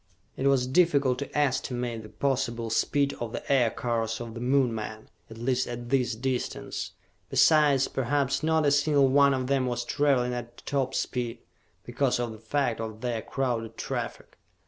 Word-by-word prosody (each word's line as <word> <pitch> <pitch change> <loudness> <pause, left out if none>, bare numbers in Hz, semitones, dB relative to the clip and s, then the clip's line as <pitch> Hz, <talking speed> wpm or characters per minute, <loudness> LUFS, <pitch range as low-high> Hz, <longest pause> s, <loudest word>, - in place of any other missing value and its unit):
It 135 - 0
was 135 -2 +3
difficult 140 -3 +3
to 140 - -5
estimate 125 -4 -1
the 105 - -11
possible 120 -2 -1
speed 140 +5 +1
of 120 -1 -4
the - - -4
Aircars 115 -3 0
of 115 -1 -6
the 115 - -7
Moon 125 0 +2
men, 110 0 -6 0.2
at 110 - -10
least 125 +2 0
at 120 0 -6
this 125 -3 +1
distance. 125 +2 -3 0.4
Besides, 150 -4 +4
perhaps 140 +1 0
not 160 0 +2
a 145 - +4
single 145 -1 +4
one 140 0 +5
of 130 -1 -2
them 135 -1 +1
was 120 -1 -2
traveling 135 -4 +1
at 120 -1 -7
top 135 -2 -1
speed, 120 -2 -3 0.4
because - - 0
of 120 -1 -2
the 110 - -10
fact 115 0 -1
of 110 -1 -6
their 120 -3 -2
crowded 115 -4 -3
traffic. - - -5
125 Hz, 170 wpm, -27 LUFS, 120-140 Hz, 0.4 s, one